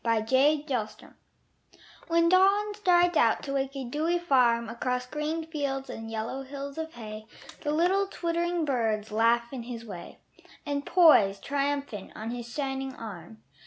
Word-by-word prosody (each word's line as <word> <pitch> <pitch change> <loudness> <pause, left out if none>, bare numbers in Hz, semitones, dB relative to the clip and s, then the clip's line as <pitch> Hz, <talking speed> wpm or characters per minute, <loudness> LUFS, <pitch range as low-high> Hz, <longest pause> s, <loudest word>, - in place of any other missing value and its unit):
Alarm 260 +7 +3
Clocks 225 -7 -2 1.1
When 335 0 +3
Dawn 395 +3 +4
strides 355 -4 +3
out 230 -6 +3
to 275 - -4
wake 270 0 -1
a 270 - -4
dewy 310 +8 0
farm 250 -8 +3
Across 250 +2 -2
green 305 +4 -3
fields 275 -4 -3
and 225 0 -7
yellow 225 +4 -4
hills 280 +2 -7
of 320 0 -5
hay 215 -2 -8 0.3
The 295 - -3
little 365 +6 +2
twittering 340 -2 -1
birds 225 -6 -1
laugh 235 +3 +2
in 255 - -4
his 235 -1 -7
way 180 -5 -9 0.5
And 285 -1 -3
poise 225 - +6
triumphant 280 -7 -3
on 220 +2 -5
his 240 -1 -6
shining 270 -1 -3
arm. 170 - -10
270 Hz, 150 wpm, -28 LUFS, 230-320 Hz, 1.1 s, poise